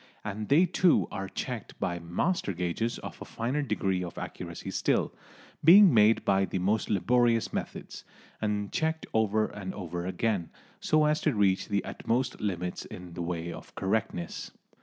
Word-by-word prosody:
And 105 +1 -4
they 155 +6 +6
too 180 -1 +3
are 95 0 -4
checked 120 0 -5
by 85 -1 -1
master 95 - -1
gauges 90 +7 -2
of - - -9
a - - -3
finer 125 +6 -2
degree 95 -9 -1
of 85 - -7
accuracy - - -6
still, - - +1 0.5
being 185 +2 +9
made 110 0 +5
by 95 0 +3
the 95 - -3
most 100 +5 0
laborious 115 +3 +2
methods, - - -5 0.4
and 105 -2 -1
checked 160 0 -1
over 110 -1 +2
and 100 -3 -6
over 90 -2 -4
again, 95 -2 -1 0.3
so 155 0 +3
as 150 +1 +2
to - - +1
reach 95 -2 +2
the 100 -1 -1
utmost 125 +3 -2
limits 90 -3 -2
in 90 -1 -10
the 85 - -5
way 85 0 -3
of - - -12
correctness. 95 -3 -2
105 Hz, 160 wpm, -29 LUFS, 90-120 Hz, 0.5 s, being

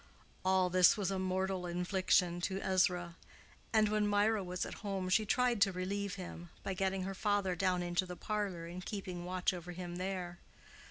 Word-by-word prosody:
All 185 -1 +3
this 180 +1 +6
was 195 -3 -1
a 190 - -1
mortal 185 0 -1
infliction 180 0 +1
to 190 +2 -1
Ezra; 180 -3 +1 0.5
and 220 -1 +4
when 210 0 +1
Mirah 205 0 +3
was 180 0 -3
at - - -6
home 195 -3 -2
she 215 +3 +3
tried 245 -2 +2
to 200 -1 +5
relieve 195 +2 -3
him, 175 -2 -8
by 195 - -2
getting 190 0 0
her 195 +1 -3
father 200 -2 +1
down 180 0 +1
into 175 +1 0
the 180 - -6
parlor 200 -5 -2
and 175 +2 -7
keeping 185 -3 -5
watch 185 +1 0
over 175 0 -7
him 175 0 -6
there. 180 -2 -4
185 Hz, 180 wpm, -34 LUFS, 180-200 Hz, 0.5 s, this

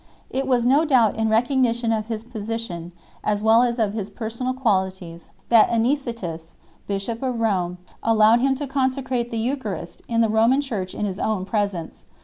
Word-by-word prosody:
It 265 0 -2
was 245 -3 +2
no 275 +5 +4
doubt 250 -9 +3
in 220 0 0
recognition 235 0 +2
of 215 -1 -2
his 225 -1 -4
position 220 -7 -5 0.3
as 210 0 0
well 225 +1 +6
as 240 -1 +1
of 215 -3 0
his 210 -2 -4
personal 230 +4 -4
qualities 190 -8 -1 0.2
that 230 -2 +6
Anicetus, 230 - -2 0.3
bishop 200 +3 -3
of 255 -3 -2
Rome, 185 -6 0 0.2
allowed 225 +1 +5
him 270 +2 +2
to 290 +2 -4
consecrate 260 -2 -1
the 230 - -4
Eucharist 220 - -3
in 230 -1 +1
the 225 - +4
Roman 225 +5 +3
Church 215 -10 -4
in 210 - -2
his 195 0 -4
own 210 -4 -1
presence 200 -5 -3
3 - - -35
225 Hz, 175 wpm, -23 LUFS, 205-250 Hz, 0.3 s, well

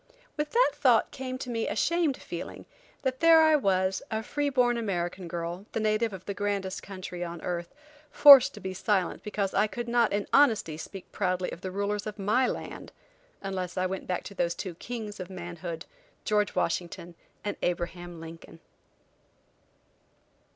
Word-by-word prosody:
With 300 0 -2
that - - +4
thought - - +3
came 255 -1 -5
to 255 - -6
me 230 -1 -1
a - - -2
shamed 330 +1 +1
feeling - - -7 0.4
that 260 -1 -1
there 330 -1 +7
I 315 -1 +6
was, 190 -7 +1
a 220 0 -2
free 290 +5 -1
born 250 -3 +3
American 185 -5 -2
girl, 170 +4 -5
the - - 0
native 215 +1 +1
of 190 -2 -9
the 200 - -3
grandest 195 -1 -2
country 185 -2 -6
on 170 -1 -6
earth, 175 -1 -3 0.4
forced 275 -2 +9
to - - -9
be 190 0 -5
silent 190 -2 0
because 200 -2 -2
I 205 +2 +3
could 240 +2 -5
not 235 -1 +3
in 205 0 0
honesty 225 - +4
speak 185 +4 -9
proudly 185 -2 -1
of 170 - -8
the 190 - -4
rulers 200 +2 -2
of 215 - -6
my 215 +6 +2
land, - - -6 0.5
unless 185 -2 -4
I 185 - +1
went 190 +1 -4
back 180 - -2
to 200 - -9
those 175 -3 0
two 185 -1 -5
kings 215 +2 -6
of 185 0 -6
manhood, 175 -2 -6 0.4
George 210 -1 +1
Washington 175 0 -2 0.3
and 205 - -1
Abraham 175 0 -3
Lincoln. 165 0 -11
200 Hz, 170 wpm, -28 LUFS, 180-235 Hz, 0.5 s, forced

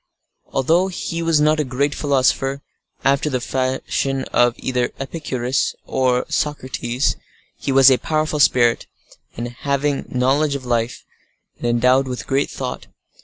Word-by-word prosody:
Although 165 +8 +2
he 170 -2 -4
was 165 -2 +2
not 155 +1 +3
a - - +2
great 140 +2 -1
philosopher, 135 -1 +1 0.4
after 140 +2 +2
the 130 -3 -1
fashion 130 +1 -1
of 120 0 +4
either 125 -2 -1
Epicurus 135 -3 -2
or 130 -1 +1
Socrates, 130 -3 -1 0.4
he - - -3
was 135 0 +7
a 130 - +3
powerful 155 -1 -1
spirit, 120 -4 +3 0.7
having 140 0 -1
knowledge 140 +4 +1
of 135 -2 -6
life, 120 -1 -1 0.6
and - - -2
endowed 125 +3 +3
with 125 -1 -4 0.3
thought. 125 -2 -5
135 Hz, 125 wpm, -20 LUFS, 125-145 Hz, 0.7 s, was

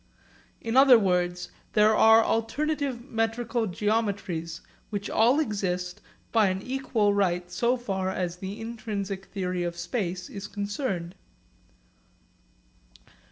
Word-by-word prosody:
In 225 +1 -3
other 265 -2 +8
words 180 -3 0 0.2
there 215 0 +5
are 225 +1 +7
alternative 275 +2 -1
metrical 225 -1 -1
geometries 200 -5 -2 0.3
which 205 -2 -4
all 240 +6 +4
exist 185 - -2 0.3
by 220 -3 +4
an 185 0 -1
equal 250 -6 0
right 180 -3 0
so 240 +6 +1
far 195 -6 -2
as 180 -2 -3
the 195 +3 -6
intrinsic 210 -4 -5
theory 185 -3 -3
of 170 -1 -3
space 180 -1 -3
is 200 0 -7
concerned. 200 -4 -3
205 Hz, 115 wpm, -27 LUFS, 180-230 Hz, 0.3 s, other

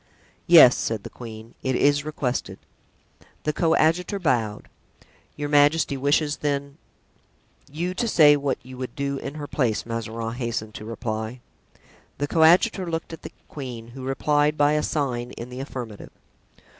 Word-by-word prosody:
"Yes," 160 -8 +9
said 110 -3 -2
the - - -9
queen, 115 -1 -10
"it 130 -1 -1
is 145 +2 +3
requested." 145 -4 -3 0.9
The 150 - 0
coadjutor 165 +4 +2
bowed. 120 - -1 0.7
"Your 145 0 -3
majesty 145 0 +3
wishes, 145 +2 +1
then——" 140 -1 -3 0.9
"You 175 +5 -3
to 235 +5 -1
say 150 -8 +6
what 140 -2 -1
you 130 +1 -11
would 130 - -6
do 140 0 -2
in 140 - -6
her 150 -1 -5
place," 125 -7 -1
Mazarin 115 0 -4
hastened 115 -3 -4
to 105 - -8
reply. 110 +1 -4 0.8
The 145 - -1
coadjutor 175 +4 +4
looked 165 0 -4
at 160 - -9
the - - -9 0.2
queen, 120 -5 -8
who 130 +2 -10
replied 145 +3 +1
by 145 0 +4
a 150 0 +2
sign 125 -6 -2
in 120 +1 -8
the 125 +1 -8
affirmative. 125 -6 -7
140 Hz, 150 wpm, -24 LUFS, 120-150 Hz, 0.9 s, Yes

